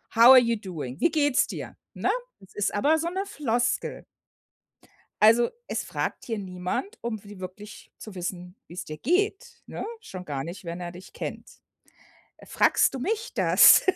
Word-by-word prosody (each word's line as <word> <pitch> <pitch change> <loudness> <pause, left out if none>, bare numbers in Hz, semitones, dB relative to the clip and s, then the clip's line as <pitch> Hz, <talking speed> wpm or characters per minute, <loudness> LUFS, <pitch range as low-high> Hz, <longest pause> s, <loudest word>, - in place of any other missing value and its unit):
„How 230 +1 +7
are 260 - +11
you 235 -1 +1
doing? 160 - -7
wie 335 - +3
geht's 290 -4 +2
dir,“ - - -7 0.2
ne? - - -1 0.3
Es 190 - -19
ist 205 -1 0
aber 290 +10 +3
so 335 +2 -2
'ne 385 +3 -3
Floskel. 245 - -1 1.2
Also, 230 +2 +6 0.2
es - - -3
fragt - - -3
hier 225 -3 -3
niemand, 185 - -4
um 220 -3 -4
wi 205 -1 -11
wirklich 205 +3 -10
zu 215 -3 -10
wissen, 180 +1 -6
wie 170 - -12
es 180 - -5
dir 155 0 -8
geht, 410 - -1
ne? - - -6 0.2
Schon 185 - -9
gar 140 -4 -4
nicht, 175 +4 -8
wenn 170 +1 -5
er 175 0 -5
dich 180 +1 -13
kennt. - - -6 1.0
Fragst - - +3
du - - -3
mich 445 - -2
das, - - +7
215 Hz, 170 wpm, -26 LUFS, 180-290 Hz, 1.2 s, are